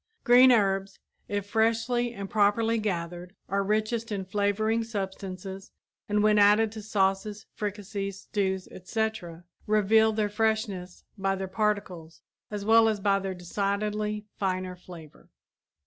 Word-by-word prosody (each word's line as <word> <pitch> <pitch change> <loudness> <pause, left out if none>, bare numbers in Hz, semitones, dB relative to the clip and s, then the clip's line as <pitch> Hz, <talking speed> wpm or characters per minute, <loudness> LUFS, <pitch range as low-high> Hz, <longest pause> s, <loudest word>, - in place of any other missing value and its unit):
Green 250 +2 +7
herbs, 195 -3 +1 0.3
if 205 -1 -3
freshly 230 +3 +1
and 200 -4 -6
properly 220 +3 +2
gathered, 175 -2 -4
are 200 +1 0
richest 215 +3 -1
in 195 -2 -3
flavoring 210 +3 0
substances 195 -2 -6 0.4
and 210 0 +2
when 210 0 +4
added 210 +2 +5
to 220 0 -8
sauces, 205 0 -1
fricassees, 200 -2 -4
stews, 190 -3 -2
etc., 185 -4 -4 0.2
reveal 215 +1 +4
their 215 -1 0
freshness 210 -4 -2 0.2
by 195 0 +1
their 190 0 -4
particles 185 -5 -2 0.3
as 205 -1 -5
well 225 0 +6
as 215 -2 -1
by 195 0 +2
their 190 -1 -4
decidedly 210 +3 -2
finer 185 -1 -2
flavor. 170 -4 -14
205 Hz, 130 wpm, -27 LUFS, 190-220 Hz, 0.4 s, Green